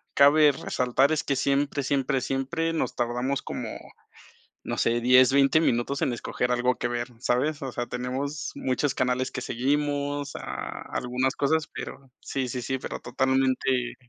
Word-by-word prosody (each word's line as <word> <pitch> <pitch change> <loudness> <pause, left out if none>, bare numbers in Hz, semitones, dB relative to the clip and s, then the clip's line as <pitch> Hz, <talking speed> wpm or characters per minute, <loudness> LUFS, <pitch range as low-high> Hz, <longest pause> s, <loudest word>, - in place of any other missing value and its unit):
cabe 145 +1 +7
resaltar 130 +1 +1
es 155 - 0
que 140 - 0
siempre, 140 +1 +1
siempre, 135 -1 0
siempre 160 +6 -1
nos 160 - -1
tardamos 125 +3 -1
como, - - -5 1.0
no - - -3
sé, 120 +1 +2
10, 125 +2 +6
20 140 +3 +5
minutos 130 -1 0
en 130 - +1
escoger 125 +1 -2
algo 125 +1 +1
que - - -2
ver, 120 +1 -2
¿sabes? 140 +5 0
O 135 - -3
sea, 120 0 -3
tenemos 130 +4 -4
muchos 130 +2 0
canales 130 0 0
que 125 - -4
seguimos, 145 +3 -1
ah, - - -6
algunas 125 +2 -1
cosas, 155 +2 +1
pero 135 -1 -8
sí, 130 -2 -3
sí, 125 +1 -3
sí, 130 +1 -2
pero - - -5
totalmente 130 -1 +1
130 Hz, 160 wpm, -26 LUFS, 125-140 Hz, 1.0 s, cabe